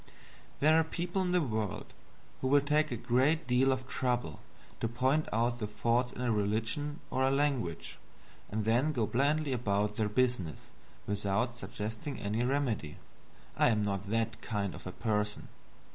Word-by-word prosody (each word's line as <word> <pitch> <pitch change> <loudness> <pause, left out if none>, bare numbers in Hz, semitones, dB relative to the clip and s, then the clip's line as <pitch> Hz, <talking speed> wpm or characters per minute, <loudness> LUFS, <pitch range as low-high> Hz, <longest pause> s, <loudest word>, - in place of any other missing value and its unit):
There 155 +2 +6
are - - +4
people 175 +3 -2
in 180 -1 0
the 180 -2 +3
world 110 -6 -3 0.5
who 130 - -1
will 145 +2 +6
take 150 +2 +2
a 120 - -1
great 130 +7 +2
deal 130 +2 +3
of 130 0 -2
trouble 125 - -1 0.4
to - - 0
point 130 +6 +1
out 120 +2 +1
the 105 - -2
faults 120 +3 +1
in - - -6
a 125 -2 +1
religion 115 +9 -1
or 130 - 0
a 130 - +4
language, 135 - -1 0.5
and 105 +1 -2
then 125 +7 +2
go 120 -5 +1
blandly 140 +6 +1
about 105 -3 0
their 110 -1 +1
business 105 - -1 0.3
without 105 +4 -1
suggesting 110 +6 -5
any 105 +3 -1
remedy. 125 - -1 0.6
I - - +4
am 105 -3 +2
not 100 0 -2
that 115 +1 -1
kind 100 -5 -2
of 85 - -9
person. 105 -2 -1
120 Hz, 160 wpm, -32 LUFS, 105-135 Hz, 0.6 s, There